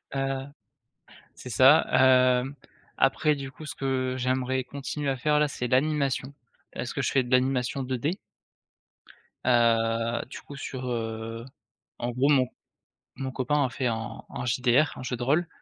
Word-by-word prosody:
Heu, 135 0 -1 0.9
c'est 125 - -10
ça, 130 +8 +6
hem, 130 +1 +4 0.4
après 150 +3 +3
du 135 -1 -7
coup 155 - -11
ce - - -5
que 130 -1 -1
j'aimerais 130 0 0
continuer 140 +2 -4
à 135 - -1
faire 150 +3 +2
là, 150 - +3
c'est 125 -3 -4
l'animation. 140 0 +1 0.4
Parce 120 0 -4
que 140 - -2
je - - 0
fais 130 -2 +3
de 125 - -9
l'animation 130 +1 +1
2D 130 - -2 1.3
heu, 115 -1 +2
du - - -8
coup 140 - -11
sur, 130 -1 -6
heu, 115 0 -4 0.5
en 120 0 -2
gros 130 +4 +2
mon 130 -4 +4 0.7
mon 135 -1 -4
copain 140 +3 +1
a - - -2
fait 130 0 -2
un 115 -1 -4
un 125 - -5
JDR, 125 +4 +3
un - - -7
jeu 125 - -2
de 120 - -4
rôle. 155 +6 +2
130 Hz, 160 wpm, -27 LUFS, 125-140 Hz, 1.3 s, ça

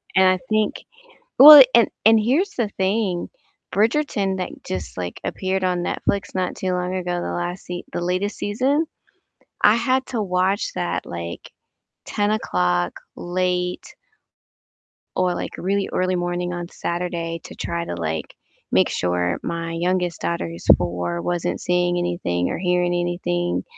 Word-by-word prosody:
and 190 0 +6
I 185 0 +3
think 215 -1 0 0.6
well, 295 +1 +13
and 235 -2 +6 0.2
and 225 0 +7
here's 295 - +1
the 230 -4 0
thing, 190 -2 0 0.5
"Bridgerton" 210 -4 +1
that 180 - -3
just, 95 0 -5
like, 90 -1 -5
appeared 190 0 -2
on 180 -1 +1
Netflix 200 -1 -2
not 185 -1 -1
too 185 -1 -2
long 180 +1 -2
ago, 175 -1 -2
the - - -3
last 175 +1 -4
se 175 0 -5
the - - -2
latest 185 +4 -1
season, 270 +9 0 0.8
I 210 +2 +7
had 260 +3 +1
to 230 -4 -2
watch 185 +2 0
that, 85 -1 -2
like, 85 0 -7 0.5
10 205 0 0
o'clock 90 - 0 0.2
late 180 0 -1 1.3
or, 180 -1 +1
like, - - -4
really 200 +2 -1
early 185 0 0
morning 175 0 -2
on 175 -1 -5
Saturday 170 -1 -3
to - - -10
try 170 0 -3
to, - - -5
like, 80 -2 -4 0.4
make - - +4
sure 90 0 -1
my 165 0 -3
youngest 175 0 -1
daughter, 85 0 -2
who's 85 +1 -9
4, 85 -1 -3
wasn't 175 -1 -2
seeing 175 0 +1
anything 170 - -1
or - - -3
hearing 180 0 +1
anything 175 0 -1
180 Hz, 150 wpm, -22 LUFS, 170-195 Hz, 1.3 s, well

